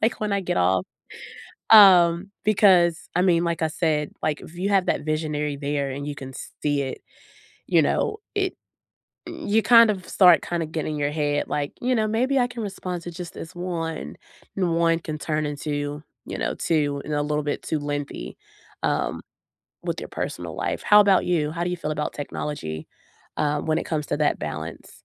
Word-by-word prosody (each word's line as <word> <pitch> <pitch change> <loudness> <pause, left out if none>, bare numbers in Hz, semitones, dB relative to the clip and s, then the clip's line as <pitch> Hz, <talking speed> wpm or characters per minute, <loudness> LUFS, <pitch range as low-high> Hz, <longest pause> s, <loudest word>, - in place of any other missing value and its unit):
like 220 - +1
when 210 -1 -2
I 200 - +1
get 185 - -2
off, 90 +1 +2 0.8
um, 185 -3 +7
because 185 -5 +4
I 180 - +4
mean, 175 -3 +3
like 170 -1 -1
I - - +3
said, 155 -2 -1
like, 155 -1 -1
if 160 - -12
you 185 +3 -1
have 195 -2 +2
that - - 0
visionary 150 -1 -2
there 140 -1 -2
and 140 +2 -5
you 145 - -4
can 135 -2 -8
s 130 - -9
see 145 -1 +1
it, 130 - -5 0.7
you - - +4
know, 430 - 0 0.2
it 385 -2 0 0.7
mm, 335 -6 -7
you 220 +2 +3
kind 230 +1 +7
of 185 -3 -4
start 180 -4 +6
kinda 170 -2 -2
getting 155 -1 -3
your 145 -1 0
head 145 -1 -1
like, 145 -1 -2
"You 255 +1 +1
know, 220 -2 +1
maybe 250 +6 +1
I 245 -1 +2
can 240 -2 -6
respond 185 -3 -5
to 175 - -6
just 175 0 -8
this 160 - -9
1," 165 - -4 0.4
and 175 -4 +1
1 165 0 +3
can 155 -2 -5
turn 155 0 -1
into, 145 0 -4 0.2
you - - -5
know, - - -1
2 145 -3 0
and 150 - -3
a 145 - +1
little 150 0 -1
bit 145 - -2
too 155 - -2
lengthy, 145 - -5 0.5
um, - - -1 0.6
with - - -3
your - - -7
personal - - -5
life. - - -3
How 210 0 +7
about 200 -2 +4
you? 160 -4 +1
How 170 +2 -3
do 175 - -1
you 180 - -2
feel 155 - -3
about 150 0 -3
technology, 85 - -5 0.5
um, 150 -1 0
when 155 0 +2
it - - -3
comes 155 -2 -2
to - - -1
that 150 -1 +1
balance? 80 +2 -6
160 Hz, 200 wpm, -24 LUFS, 145-185 Hz, 0.8 s, um